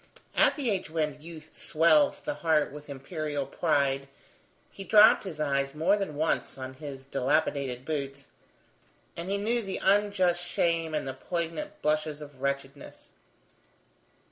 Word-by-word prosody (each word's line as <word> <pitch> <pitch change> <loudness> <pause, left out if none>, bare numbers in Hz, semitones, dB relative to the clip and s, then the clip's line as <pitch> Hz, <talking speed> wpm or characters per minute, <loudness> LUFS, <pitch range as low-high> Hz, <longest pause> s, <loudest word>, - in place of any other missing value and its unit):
At - - +4
the 265 -7 -1
age 190 -5 -2
when 155 -2 -2
youth 155 -1 -11
swells 170 - +3
the 295 - -3
heart 160 - +1
with 150 +1 -11
imperial 145 +1 -4
pride, 135 0 0 0.6
he 195 - -8
dropped 215 +2 +6
his 165 -5 -6
eyes 140 -1 0
more 170 +6 +3
than 195 -7 -3
once 155 -2 -1
on 130 0 -6
his 135 -1 -8
dilapidated 135 -2 0
boots, 140 -3 -4 0.9
and 170 +2 -5
he 200 - +1
knew 230 +4 0
the 195 -3 -4
unjust 190 -3 +2
shame 165 -2 0
and 150 - -2
the 135 - -3
poignant 165 -1 -4
blushes 155 0 0
of 145 -3 -11
wretchedness. 140 0 -4
155 Hz, 145 wpm, -28 LUFS, 140-175 Hz, 0.9 s, dropped